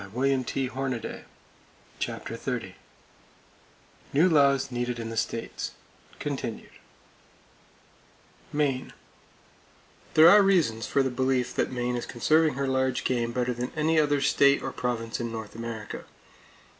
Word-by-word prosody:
[Page 130 +6 -1
283] 130 -2 -3 0.7
CHAPTER - - -4
XXX - - -4 1.4
NEW 160 +6 +5
LAWS 140 -4 +3
NEEDED 120 0 -2
IN 115 -1 -5
THE - - -5
STATES 115 +1 -3 0.4
(Continued) - - -5 1.8
Maine: 140 -3 -1 1.2
There 155 +1 +9
are 205 +4 +9
reasons 165 - +2
for 140 - +2
the 130 - -1
belief 130 0 0
that - - 0
Maine 125 -1 -1
is 120 - -4
conserving 155 +5 +2
her 140 0 -1
large 130 -1 0
game 120 -2 0
better 125 +1 -1
than 120 +1 -4
any 160 +1 +2
other 145 -2 +2
state 140 0 +4
or 135 - -3
province 115 -3 -3
in 120 -1 -3
North 110 -2 -6
America. 115 -1 -6
130 Hz, 125 wpm, -27 LUFS, 120-140 Hz, 1.8 s, There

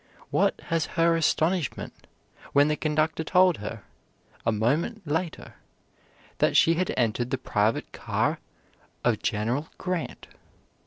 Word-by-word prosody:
What - - +2
has 165 -2 +1
her 165 0 +4
astonishment 165 0 0 0.5
when 145 +1 +5
the 150 - +2
conductor 155 +1 0
told 180 +1 +4
her, 105 +1 -6 0.6
a - - +5
moment 150 - 0
later, 160 +3 -3 0.8
that - - +3
she 165 - +6
had 180 +2 0
entered 120 0 +1
the 135 - 0
private 110 -3 0
car - - -1 0.6
of 110 -3 +1
General 120 +8 -1
Grant. 180 -3 -4
150 Hz, 120 wpm, -26 LUFS, 120-165 Hz, 0.8 s, she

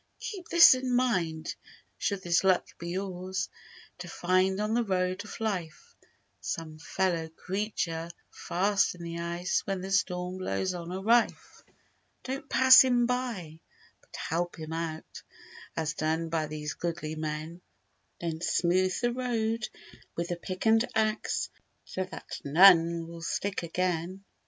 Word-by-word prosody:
Keep 380 -5 -7
this 340 -4 +9
in 255 -1 -1
mind: 175 -11 0 0.5
Should 200 -2 -1
this 170 0 +2
luck 190 -2 +3
be 170 - -5
yours 190 0 -3 0.5
To 180 - -7
find 185 +3 +1
on 210 +1 0
the 240 +1 +2
Road 185 -1 -1
of 210 - -9
Life 185 -8 -4 0.5
Some 155 -1 -5
fellow 165 -1 -1
creature 170 -2 -3 0.2
fast 195 +2 +1
in 175 - -10
the 170 0 -5
ice 170 +2 -1
When 195 -2 -2
the 190 +1 -6
storm 180 -1 0
blows 185 0 -1
on 175 -1 -6
a 185 - -3
rife, 230 +3 +1 0.6
Don't 265 +1 -5
pass 260 0 +8
him 245 -2 +3
by, 235 -11 -3 0.4
but - - -15
help 175 +2 -2
him 160 0 -6
out— 165 -1 -5 0.6
As 160 -1 -1
done 160 +1 -1
by 160 -1 -1
these 150 0 -5
goodly 170 -2 -4
men— 155 +2 -5 0.6
Then 165 -1 -4
smooth 180 +1 +2
the 240 -1 +1
road 230 -3 -1 0.5
with 170 0 -2
the 175 - -1
pick 185 +3 -6
and 225 +1 +5
axe 215 0 0 0.3
So 185 - -3
that 185 - -8
none 170 +1 +6
will 170 0 -9
stick 195 +4 -2
again. 180 +2 -2
180 Hz, 145 wpm, -29 LUFS, 165-205 Hz, 0.6 s, this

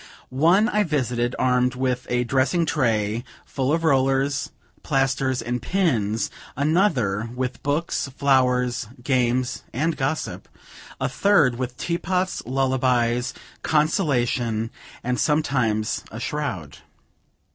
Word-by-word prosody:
One, 170 - +4
I 210 -3 +1
visited, 125 - -1
armed 125 0 +2
with 130 -1 -1
a 125 0 +1
dressing 135 +7 +1
tray, 115 -7 0 0.2
full 135 0 -1
of 165 +1 +1
rollers, 135 -2 +2 0.3
plasters, 135 -2 0
and 120 +1 -2
pins; 115 - 0 0.3
another, 140 - +1
with 125 0 -3
books, 145 +2 -1
flowers, 125 -3 +1 0.2
games, 125 -1 +1
and 155 +6 0
gossip; 135 +3 -3 0.5
a - - 0
third, 150 -12 +3
with 125 -1 -4
teapots, 180 +4 -1
lullabies, 125 -2 +1 0.3
consolation, 125 - +1 0.3
and 125 0 -1
sometimes, 130 -8 +1
a 110 - -8
shroud. 120 - -4
130 Hz, 105 wpm, -23 LUFS, 120-150 Hz, 0.5 s, One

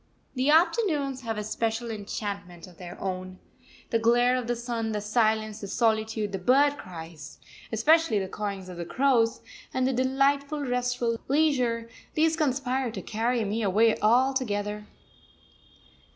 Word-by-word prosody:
The 260 +2 0
afternoons 305 - +2
have 225 -3 -4
a 210 - -2
special 225 +2 -2
enchantment 200 -4 -6
of 180 -3 -17
their 175 -1 -9
own. 185 -1 -4 0.5
The 230 - +2
glare 240 +2 +4
of 250 -2 -2
the 240 - 0
sun, 230 -2 -3
the 210 - -1
silence, 215 0 0
the 200 - -5
solitude, 220 0 0
the 195 - -3
bird 280 +8 +4
cries, 165 -3 -9 0.3
especially 305 +3 +3
the 190 -1 -1
cawings 200 -1 -5
of 175 -2 -7
crows, 250 -4 +2 0.3
and 260 0 0
the 265 - +1
delightful, 275 +3 +1
restful 245 -3 -1
leisure 255 -6 +1 0.3
these 320 +1 +3
conspire 265 -4 0
to 225 - -6
carry 230 +1 -1
me 210 +3 -2
away 215 +2 +3
altogether. 215 -3 +1
230 Hz, 140 wpm, -27 LUFS, 210-260 Hz, 0.5 s, glare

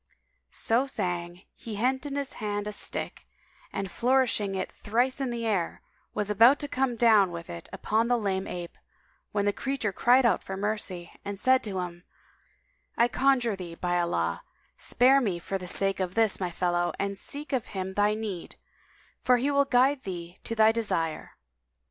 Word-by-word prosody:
So 240 +4 +1
saying, 175 -5 -3
he 225 -2 -8
hent 260 +6 0
in 280 - -5
hand 210 -7 -3
a 210 - -3
stick - - -3
[FN#190] - - -34 0.5
and 195 -2 -3
flourishing 240 -5 +1
it 185 - -3
thrice 245 +6 0
in 265 - -1
the 235 -1 -3
air, 195 -6 -1 0.3
was 210 -1 -1
about 230 +7 +6
to 290 - -2
come 260 -3 0
down 220 -5 +5
with 170 -1 -7
it 85 -1 -9
upon 225 +2 0
the 245 0 +3
lame 195 -3 -1
ape, 175 -1 -7 0.5
when 205 -1 0
the 205 - +2
creature 265 -6 -2
cried 250 +5 +4
out 235 - +3
for 190 - -6
mercy 195 -4 -2
and 200 0 -5
said 260 +5 +3
to 200 -3 -3
him, 175 -1 -5 0.9
"I 235 +1 +4
conjure 250 -4 +2
thee, 175 -3 -8
by 175 0 0
Allah, 85 - -1 0.3
spare 265 +3 +4
me 195 -8 0
for 195 +3 -4
the 180 - -7
sake 195 +2 +1
of 185 -1 -2
this 225 -3 +3
my 185 -2 -1
fellow 175 0 0
and 200 0 -2
seek 285 +8 -6
of 255 -4 0
him 190 -1 -4
thy 205 +1 +2
need; 210 -6 -5 0.7
for 250 - +5
he 270 +4 0
will 280 0 +3
guide 270 +1 +3
thee 175 -3 -7
to 230 - -3
thy 220 0 +6
desire!" 185 -8 -2
210 Hz, 180 wpm, -28 LUFS, 185-245 Hz, 0.9 s, about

